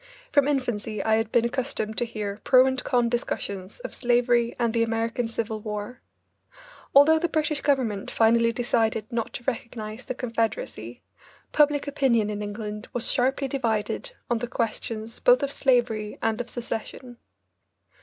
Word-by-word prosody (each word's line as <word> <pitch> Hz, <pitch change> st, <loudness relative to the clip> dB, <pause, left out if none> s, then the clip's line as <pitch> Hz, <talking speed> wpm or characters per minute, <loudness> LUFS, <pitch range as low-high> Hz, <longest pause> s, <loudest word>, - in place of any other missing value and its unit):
From 285 Hz, -1 st, +4 dB
infancy 230 Hz, -7 st, -1 dB
I 220 Hz, 0 st, +3 dB
had 225 Hz, 0 st, -1 dB
been 235 Hz, -1 st, +3 dB
accustomed 235 Hz, -3 st, -2 dB
to 240 Hz, -, +1 dB
hear 210 Hz, -3 st, -5 dB
pro 255 Hz, -1 st, +6 dB
and 265 Hz, 0 st, 0 dB
con 245 Hz, -1 st, +2 dB
discussions 200 Hz, -, -3 dB
of -, -, -5 dB
slavery 240 Hz, -1 st, +2 dB
and 235 Hz, -2 st, 0 dB
the 230 Hz, -, +2 dB
American 230 Hz, +1 st, 0 dB
Civil 225 Hz, -1 st, -3 dB
War. 210 Hz, +3 st, -6 dB, 0.9 s
Although 310 Hz, +3 st, +7 dB
the 345 Hz, +1 st, 0 dB
British 305 Hz, -2 st, 0 dB
government 250 Hz, -9 st, 0 dB
finally 230 Hz, +1 st, +3 dB
decided 225 Hz, -3 st, 0 dB
not 230 Hz, -1 st, -2 dB
to -, -, -6 dB
recognise 230 Hz, -2 st, -4 dB
the 255 Hz, -, -4 dB
Confederacy, 225 Hz, -, -3 dB, 0.5 s
public 295 Hz, -1 st, +3 dB
opinion 240 Hz, -7 st, +2 dB
in 210 Hz, 0 st, -4 dB
England 210 Hz, +1 st, -5 dB
was 245 Hz, -1 st, +1 dB
sharply 270 Hz, +2 st, +1 dB
divided 255 Hz, -, -1 dB
on 240 Hz, -1 st, 0 dB
the 245 Hz, -, -3 dB
questions 230 Hz, -1 st, -3 dB
both -, -, +5 dB
of 280 Hz, -, -1 dB
slavery 240 Hz, -6 st, +1 dB
and 225 Hz, +1 st, 0 dB
of 245 Hz, -, -6 dB
secession. 240 Hz, +1 st, -6 dB
235 Hz, 155 wpm, -26 LUFS, 220-255 Hz, 0.9 s, Although